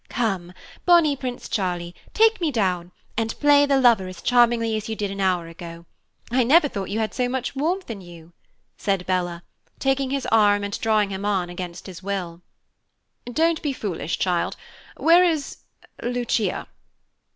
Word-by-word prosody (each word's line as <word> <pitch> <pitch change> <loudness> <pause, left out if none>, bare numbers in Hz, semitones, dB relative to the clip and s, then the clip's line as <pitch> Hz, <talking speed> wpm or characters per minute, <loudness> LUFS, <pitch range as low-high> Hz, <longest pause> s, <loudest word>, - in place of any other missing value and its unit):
"Come, 190 -7 -2 0.3
bonny 340 -5 +5
Prince 255 -2 -5
Charlie, 175 -3 -2 0.2
take 450 -1 +3
me 330 - +2
down, 180 -7 -1 0.2
and 225 0 -2
play 290 0 +5
the 275 -1 +3
lover 230 -7 +4
as 185 -1 -9
charmingly 235 -2 +3
as 215 0 -4
you 220 - -2
did 205 -2 -3
an 195 0 -4
hour 180 -3 +1
ago. 170 0 -10 0.5
I 255 +1 +3
never 290 +6 +5
thought 200 -8 -5
you 205 - -2
had 220 -1 -1
so 250 -1 0
much 260 +1 -3
warmth 345 +7 -1
in 220 -4 -6
you," 170 -1 -14 0.5
said 195 -3 -1
Bella, 175 -2 -1 0.3
taking 270 0 0
his 275 -1 -2
arm 205 -2 +4
and 200 0 -4
drawing 215 -3 +2
him 190 +1 -4
on 190 -4 0
against 175 -1 -7
his 185 -3 -9
will. 185 -3 -4 0.9
"Don't 325 +4 +1
be 290 -3 -1
foolish, 180 -8 -3
child. 180 -2 0 0.4
Where 340 +2 +6
is 320 -5 0 0.4
Lucia?" 240 -5 -1
215 Hz, 165 wpm, -23 LUFS, 185-265 Hz, 0.9 s, Where